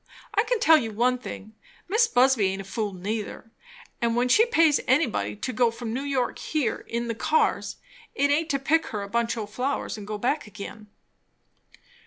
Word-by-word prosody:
I 425 0 +3
can 480 0 0
tell 320 -5 +6
you 230 -5 -3
one 250 +3 +1
thing. 220 -3 -8 0.3
Mis' 445 +5 +3
Busby 250 - +4
aint 195 +1 -3
a - - -8
fool 205 +2 -3
neither; 210 +4 -5 0.5
and 230 -1 +1
when 245 +1 +1
she 450 - +5
pays 330 - +4
anybody 230 - +1
to 255 - -4
go 240 +1 +3
from 230 -1 -6
New 260 - -2
York 275 -3 -1
here 290 -8 -2
in 235 +1 -3
the 230 - -1
cars, 305 +7 +1 0.4
it 285 +1 +2
aint 315 +3 +1
to 280 - +1
pick 305 +4 +1
her 210 -2 -4
a - - -6
bunch 235 +2 -1
o' 220 - -3
flowers 250 +2 -3
and 205 - -9
go 210 0 -3
back 250 +4 -1
again." 210 +1 -9
240 Hz, 195 wpm, -26 LUFS, 215-285 Hz, 0.5 s, tell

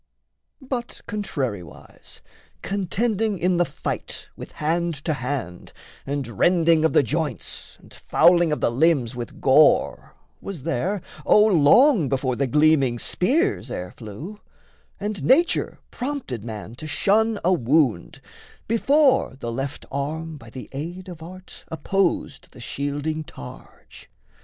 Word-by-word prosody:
But 255 -2 -5
contrariwise, 135 - -6 0.4
contending 205 +2 -1
in 180 +1 +1
the 175 - +3
fight - - -5
With - - -10
hand 170 +2 -1
to 160 - +1
hand, 125 - -5 0.3
and 135 -6 -4
rending 170 -2 +4
of 160 - +2
the - - +5
joints, 120 - -4
And - - -18
fouling 170 0 +4
of 150 - -1
the - - +2
limbs 135 -3 +2
with 120 -1 -7
gore, 145 +3 +3 0.3
was 175 -9 -7
there, 170 +6 -1 0.2
O 210 - +6
long 190 - +5
before 130 -2 0
the 140 +2 0
gleaming 150 -3 +3
spears 315 - 0
ere 90 0 -5
flew; 145 - -9 0.6
And 205 -6 -4
nature 305 - +3
prompted 250 - -4
man 110 -1 -7
to 155 - -7
shun 210 +7 +2
a 185 - +4
wound, 130 - +1 0.5
Before 265 - +3
the 120 -3 -5
left 135 +4 -5
arm 155 +4 -3
by 115 - -13
the 125 +2 -9
aid 175 +7 -6
of 170 -3 -10
art 185 +3 -11
Opposed 170 -4 -1
the - - -14
shielding 145 +5 -3
targe. 65 - -13
160 Hz, 130 wpm, -23 LUFS, 135-195 Hz, 0.6 s, O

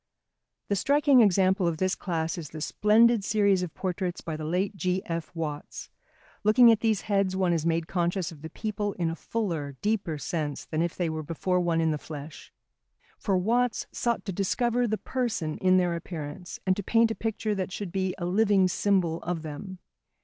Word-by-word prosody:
The 200 - +2
striking 280 +4 +4
example 190 -3 +3
of 165 -2 -1
this 185 +2 +1
class 165 -1 -2
is 165 -6 -7
the 155 - -8
splendid 215 +6 +4
series 200 -3 +2
of 180 -3 -5
portraits 185 -1 -3
by 160 - -5
the 155 - -6
late 180 +6 -1
G.F. 180 -2 -2
Watts. 150 -3 -5 0.5
Looking 230 +3 +7
at 225 - +3
these 220 -3 +1
heads 195 -2 0
one 185 -2 +2
is 165 -1 0
made 165 0 +1
conscious 175 0 -1
of 155 -3 -13
the 160 - -7
people 205 +2 -3
in 170 -2 -1
a - - -4
fuller, 165 -11 -3
deeper 205 -7 0
sense 150 -1 -3
than 155 0 -2
if 170 -1 -1
they 175 - -1
were 160 -1 -3
before 170 +4 -1
one 170 -2 +1
in 160 -1 +2
the 150 - -2
flesh. 150 0 -9 0.7
For 195 -2 +1
Watts 235 +5 +1
sought 235 -1 -1
to 195 - -3
discover 240 +6 +1
the 215 0 0
person 225 -13 -2
in 185 0 +4
their 175 -2 +2
appearance 165 0 -7
and 185 -1 +3
to - - -1
paint 230 +3 +3
a - - 0
picture 220 -1 -2
that 190 -2 -3
should 195 -1 -5
be 190 -1 -1
a 175 - -3
living 195 0 +3
symbol 180 -3 +1
of 170 -2 -3
them. 160 +5 -7
185 Hz, 195 wpm, -27 LUFS, 165-210 Hz, 0.7 s, Looking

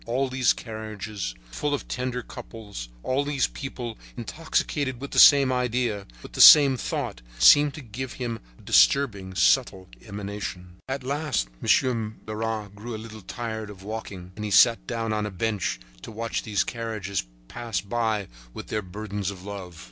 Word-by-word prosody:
All 130 +3 0
these 130 -1 +3
carriages 110 - -5 0.2
full 145 - -1
of - - -7
tender 125 -1 -3
couples, 100 - -9
all 135 +2 +1
these 140 -2 +1
people 120 -4 -6 0.2
intoxicated 135 0 -2
with 140 +1 -7
the - - +2
same 140 -3 +8
idea, 125 -5 -1 0.2
with - - -11
the - - +1
same 140 -3 +10
thought, - - -4 0.2
seemed 145 - +7
to 155 - -7
give 125 +2 -7
out 120 -2 -3 0.2
a - - -18
disturbing, 95 - +3
subtle 95 +6 +2
emanation. 100 -4 -6
At 135 0 -3
last 140 - -1
Monsieur 115 -4 +2
Leras 110 -1 -3
grew 110 +3 -7
a - - -4
little 110 0 -9
tired 110 +1 -5
of 95 -2 -11
walking, 100 -4 -7
and 105 - -6
he 105 - -2
sat 115 +4 +5
down 115 -2 -2
on 105 -1 -1
a - - -4
bench 100 - -2 0.2
to - - -9
watch 115 +1 -3
these 100 -4 0
carriages 105 - -3 0.2
pass 115 - -3
by 110 0 -1 0.3
with - - -8
their 110 - -1
burdens 100 0 -4
of 95 -2 -8
love. 95 -4 -8
110 Hz, 165 wpm, -26 LUFS, 100-125 Hz, 0.3 s, same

